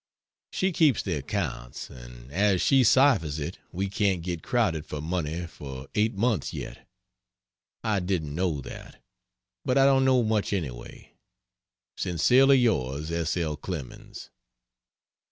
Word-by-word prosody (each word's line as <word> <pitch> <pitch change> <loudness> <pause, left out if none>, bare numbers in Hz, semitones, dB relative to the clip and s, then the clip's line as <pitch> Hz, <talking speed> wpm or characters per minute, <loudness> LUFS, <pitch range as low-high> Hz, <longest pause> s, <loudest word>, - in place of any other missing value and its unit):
She 190 +1 0
keeps 155 -7 +3
the 95 - -2
accounts; 70 - -4
and - - -12
as 100 +2 +2
she 135 +5 +4
ciphers 110 - +4
it 75 - -5
we 95 +3 -2
can't 95 -3 0
get 85 -2 -4
crowded 90 -11 0
for 75 - -5
money 85 +1 -3
for 70 -4 -9
eight 110 +1 +1
months 110 +1 0
yet. - - -8 1.0
I 110 -3 +1
didn't 90 -5 -2
know 85 -3 -1
that. - - -10 0.6
But 130 - +1
I 135 - +6
don't 135 -1 +4
know 130 -2 +4
much 110 -2 0
anyway. 65 -11 -6 0.8
Sincerely 125 - +4
yours, 80 - 0
S. 85 +1 -1
L. 80 -3 -1
CLEMENS. 75 -5 -8
90 Hz, 135 wpm, -27 LUFS, 75-110 Hz, 1.0 s, I